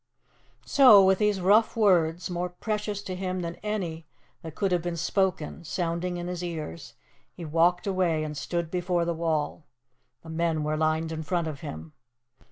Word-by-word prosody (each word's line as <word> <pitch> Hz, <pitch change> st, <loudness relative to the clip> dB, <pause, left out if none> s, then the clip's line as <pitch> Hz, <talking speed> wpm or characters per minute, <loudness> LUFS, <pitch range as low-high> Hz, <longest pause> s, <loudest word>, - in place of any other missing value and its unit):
So, 215 Hz, -8 st, +7 dB
with 190 Hz, 0 st, +3 dB
these 210 Hz, -2 st, +2 dB
rough 210 Hz, +5 st, +4 dB
words 180 Hz, -5 st, +3 dB
more 180 Hz, 0 st, -3 dB
precious 210 Hz, +2 st, -3 dB
to 185 Hz, -2 st, -5 dB
him 185 Hz, 0 st, -3 dB
than 170 Hz, 0 st, -5 dB
any 175 Hz, -7 st, -4 dB, 0.3 s
that 160 Hz, -1 st, -9 dB
could 195 Hz, -2 st, 0 dB
have 175 Hz, -1 st, +2 dB
been 175 Hz, 0 st, -3 dB
spoken 170 Hz, -2 st, -1 dB
sounding 170 Hz, +2 st, -2 dB
in 175 Hz, -, -5 dB
his 180 Hz, 0 st, -4 dB
ears, 155 Hz, -, -6 dB, 0.4 s
he 170 Hz, -, -9 dB
walked 170 Hz, +3 st, +2 dB
away 180 Hz, -5 st, +1 dB
and 150 Hz, -1 st, -5 dB
stood 170 Hz, +3 st, -3 dB
before 180 Hz, -1 st, 0 dB
the 170 Hz, -, 0 dB
wall. 160 Hz, -2 st, -2 dB, 0.6 s
The 165 Hz, -, -11 dB
men 160 Hz, -1 st, 0 dB
were 155 Hz, +1 st, -1 dB
lined 160 Hz, +1 st, 0 dB
in 160 Hz, 0 st, -4 dB
front 170 Hz, 0 st, -1 dB
of 150 Hz, -3 st, -5 dB
him. 80 Hz, 0 st, -8 dB
175 Hz, 175 wpm, -27 LUFS, 160-185 Hz, 0.6 s, So